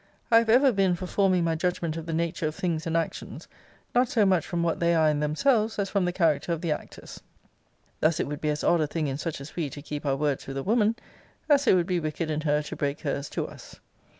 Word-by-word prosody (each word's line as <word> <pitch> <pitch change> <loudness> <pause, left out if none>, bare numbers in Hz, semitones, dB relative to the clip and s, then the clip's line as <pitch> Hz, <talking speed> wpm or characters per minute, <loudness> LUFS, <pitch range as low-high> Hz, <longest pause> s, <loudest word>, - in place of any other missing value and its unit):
I 230 - +8
have 230 -1 -1
ever 260 +4 +6
been 195 -4 +2
for 185 - -6
forming 185 -1 +2
my 165 -1 +1
judgment 170 -1 -1
of 165 0 -6
the - - -3
nature 165 0 -1
of 155 - -4
things 170 -5 -2
and 165 0 +1
actions, 165 - -4 0.5
not 245 0 +3
so 220 -5 +3
much 185 -4 +2
from 170 -1 -1
what 165 -1 0
they 170 0 +2
are 160 -1 +4
in 150 -1 +1
themselves, 215 - +1
as 200 -1 -2
from 200 -3 +1
the 180 - 0
character 170 -2 +1
of 165 - -4
the 170 -3 -1
actors. - - -7 0.8
Thus 155 +1 +2
it - - +1
would 145 0 -6
be 150 - 0
as 150 0 -2
odd 170 -2 +3
a 155 - +1
thing 160 +1 -2
in 135 0 -3
such 165 -2 -4
as 140 +3 -10
we 160 -5 -2
to 145 - -9
keep 150 -1 -5
our 140 -2 +1
words 145 -2 -1
with 135 0 -5
a 135 - -3
woman, 220 +1 +2 0.5
as 285 -3 +3
it - - +6
would 175 -2 +2
be 180 -1 0
wicked 155 0 -3
in 155 0 -1
her 150 -1 +1
to - - -7
break 140 0 -2
her's 140 -1 -3
to - - -3
us. - - -13
165 Hz, 260 wpm, -26 LUFS, 150-190 Hz, 0.8 s, I